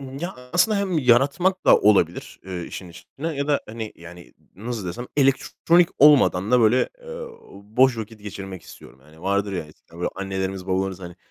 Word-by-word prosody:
Imm, 135 0 -8
ya, 175 +2 -4 0.2
aslında 200 +4 +3
hem 190 -5 0
yaratmak 140 +9 +2
da - - +8
olabilir, 95 -5 +1
eee, 90 -2 -5
işin 90 - -8
içinde 135 - -9
ya 140 -2 -3
da, 145 - +2
hani, 110 -1 -6
yani, 85 +1 -13 0.2
nasıl 110 0 -5
desem, 120 +9 -5
elektronik 150 +5 +3
olmadan 130 -9 +5
da 125 -1 +5
böyle, 115 +3 +3
eee, 485 0 -8 0.3
boş 115 +5 +1
vakit 110 0 -8
geçirmek 95 -3 -8
istiyorum. 65 - -15
Hani, 80 +3 -19
vardır 100 +1 0
ya, 90 -4 -3
eskiden 80 +2 -18
böyle 90 - -2
annelerimiz 95 -1 -4
babalarımız, 95 0 -1
hani, 90 -1 -9
105 Hz, 175 wpm, -23 LUFS, 95-140 Hz, 0.3 s, da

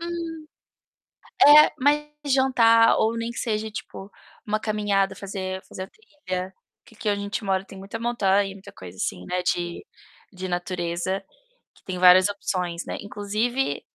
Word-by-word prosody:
Hum. 335 -2 -5 1.0
É, 300 +1 +9
mais 295 +2 +2 0.2
jantar, 250 -4 +4
ou 225 +1 +1
nem 230 +1 -3
que - - -11
seja 220 -2 -2
tipo, 200 -1 -8 0.3
uma 215 0 -1
caminhada, 205 -3 0
fazer 190 -1 -5
fazer 185 - -7
a - - -9
trilha. 190 - -7 0.3
Que 225 - -19
aqui 215 -1 -2
onde 205 - 0
a - - -4
gente 200 +2 -4
mora 190 -1 0
tem 195 - -12
muita 195 +4 -7
montanha 205 -4 +1
e - - -9
muita 195 0 -13
coisa 95 -2 -12
assim, 90 -1 -3
né, 180 0 -2
de 175 - -2 0.5
de 185 0 -6
natureza, 175 +1 -3 0.5
que - - -24
tem 185 -1 -4
várias 185 +1 +7
opções, 180 -4 -3
né, - - -5
inclusive, 210 +6 -2
200 Hz, 165 wpm, -24 LUFS, 185-230 Hz, 1.0 s, É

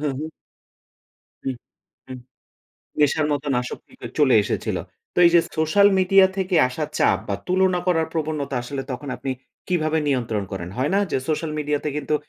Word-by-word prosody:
হু, 150 - -2
হু। 155 - -4 1.2
হু, - - -1 0.6
হু। 130 - -9 0.9
নেশার 150 +1 +3
মতোন 145 -1 -1
আশক্তিতে 125 0 -9
চলে 140 -4 +5
এসেছিল। - - -2 0.4
তো - - -1
এইযে 170 0 +6 0.2
সোশ্যাল 200 +6 +5
মিডিয়া 190 +1 +6
থেকে 185 -1 -1
আসা 150 +5 -3
চাপ - - +3
বা - - 0
তুলনা 185 0 +3
করার 165 -3 +2
প্রবণতা 150 -4 -2
আসলে 135 +2 -4
তখন 140 +3 -6
আপনি 135 - -4 0.4
কিভাবে 160 -3 +1
নিয়ন্ত্রণ 115 -6 -1
করেন? 90 -2 -4
হয় 130 +3 0
না, 200 - +4
যে - - +1
সোশ্যাল 155 0 -1
মিডিয়াতে 150 0 -1
কিন্তু 150 +1 -1
150 Hz, 155 wpm, -23 LUFS, 135-170 Hz, 1.2 s, এইযে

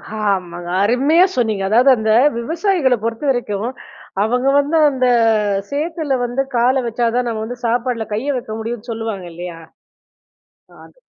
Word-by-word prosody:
ஆமாங்க. 180 -5 -2 0.2
அருமையா 280 - +4
சொன்னீங்க! 220 -5 0
அதாவது, 245 +6 +5
அந்த 220 0 0 0.3
விவசாயிகள 325 - +1
பொறுத்தவரைக்கும், 230 -3 -1 0.5
அவங்க 250 +4 0
வந்து 295 +3 +1
அந்த 260 -2 -1 0.6
சேத்துல 305 0 -2
வந்து 245 +3 -1 0.2
கால 255 +3 +3
வச்சா 235 +1 -1
தான் 250 -1 0
நம்ம 220 -2 -3
வந்து 245 +2 -7
சாப்பாட்டுல 235 -1 -1
கைய 270 +7 -1
வைக்க 240 -3 -5
முடியும்னு 235 +1 -6
சொல்லுவாங்க 220 -4 -4
இல்லையா? 175 0 -7 1.3
அதுக்கு - - -21
240 Hz, 130 wpm, -18 LUFS, 220-270 Hz, 1.3 s, அதாவது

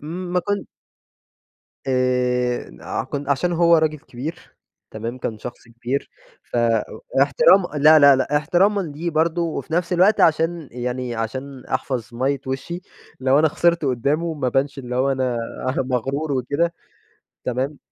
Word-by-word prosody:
م 175 +4 -6
ما 180 - +2
كنت 205 0 -2 1.2
آآ، 125 - 0
آه - - -3
كن 140 -1 -5
عشان 175 +6 +1
هو 170 0 +5
راجل 155 -1 +1
كبير، 150 +3 -8 0.4
تمام؟ 115 +3 -5
كان 110 -3 -4
شخص 120 +1 -9
كبير، 120 +4 -4 0.3
ف - - -7
إ 115 -2 +3 0.4
احترام 485 - +5 0.2
لا، 155 +1 +8
لا، 140 -2 +7
لا، 140 +2 0
احترامًا 180 +7 +2
ليه 165 0 -4
برضو، 165 +1 0
وفي 160 - -8
نفس 175 +2 0
الوقت 185 +5 +4
عشان 165 -1 +2
يعني، 125 0 -3
عشان 130 +4 -5
أحفظ 125 -3 -3
مَيِّة 130 +2 0
وشِّي، 150 +7 -4 0.4
لو 135 +2 +3
أنا 155 0 +4
خسرت 170 0 +1
قُدّامه 145 +6 0
ما 140 -4 -2
أبانش 135 +3 0
اللي 125 -1 -5
هو 135 +1 +2
أنا 130 -2 -1 0.4
مغرور 135 +4 -1
وكده 145 +7 0 0.7
تمام؟ 130 +4 -2
140 Hz, 145 wpm, -22 LUFS, 125-165 Hz, 1.2 s, لا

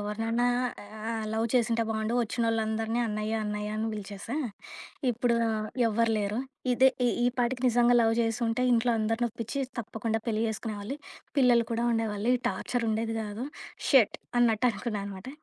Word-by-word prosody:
ఎవరినన్నా 225 +3 -1 0.7
ఆహ్, 220 -1 -2
లవ్ 225 +1 +1
చేసుంటే 230 -1 +3
బావుండు 220 +1 -1
ఒచ్చినోళ్ళందరిని 225 0 0
అన్నయ్య, 215 0 -2
అన్నయ్య 210 0 -3
అని 220 +1 -1
పిలిచేసా. 210 +5 -5 0.7
ఇప్పుడు 240 0 +1 0.5
ఎవ్వరు 230 +1 +2
లేరు. 205 +2 -1 0.3
ఇదే 260 +2 +6 0.2
ఈ - - +4 0.2
ఈ - - +4
పాటికి 245 +1 0
నిజంగా 240 +1 +4
లవ్ 225 -1 +4
చేసుంటే 225 +1 0
ఇంట్లో 240 +1 +3
అందరినొప్పించి 230 +3 -1 0.2
తప్పకుండా 225 0 -2
పెళ్లి 225 -1 0
చేసుకునేవాళ్ళు. 220 +3 -4 0.4
పిల్లలు 245 -3 +5
కూడా 230 +1 0
ఉండేవాళ్ళు. 220 -1 -1
ఈ - - -7
టార్చరుండేది 225 +2 -1
కాదు. 210 +4 -5 0.4
షిట్ 260 -7 +5 0.2
అన్నట్టు 235 0 +3
అనుకున్నాననమాట. 205 -1 -5
225 Hz, 130 wpm, -29 LUFS, 215-235 Hz, 0.7 s, ఇదే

